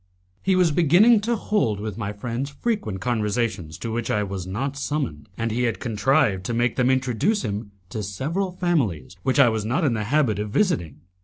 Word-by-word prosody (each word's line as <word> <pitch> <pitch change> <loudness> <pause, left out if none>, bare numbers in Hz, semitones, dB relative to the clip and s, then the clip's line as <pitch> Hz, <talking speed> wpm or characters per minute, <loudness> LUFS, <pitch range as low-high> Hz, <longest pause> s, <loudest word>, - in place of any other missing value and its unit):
He 190 -1 +2
was 180 -3 +4
beginning 175 +9 +5
to 235 +3 0
hold 200 - 0
with 105 -2 -4
my 100 -2 -3
friends 120 +6 -4
frequent 140 - -2
conversations 110 -8 -1
to 115 - -5
which 115 +1 -2
I 105 - +1
was 95 -2 -5
not 135 +9 -3
summoned, 135 - -3
and 115 0 -1
he 120 +3 0
had 115 -6 -1
contrived 115 -3 +1
to 120 - -2
make 120 0 +1
them 125 0 +2
introduce 130 - +1
him 105 -1 -4 0.2
to 110 - -4
several 150 - -2
families 145 - -1
which 130 +4 0
I 135 -4 +7
was 110 -2 -1
not 125 - 0
in 140 -6 +2
the 105 -2 -2
habit 125 -5 +2
of 105 0 -3
visiting. 105 - 0
120 Hz, 200 wpm, -24 LUFS, 105-150 Hz, 0.2 s, I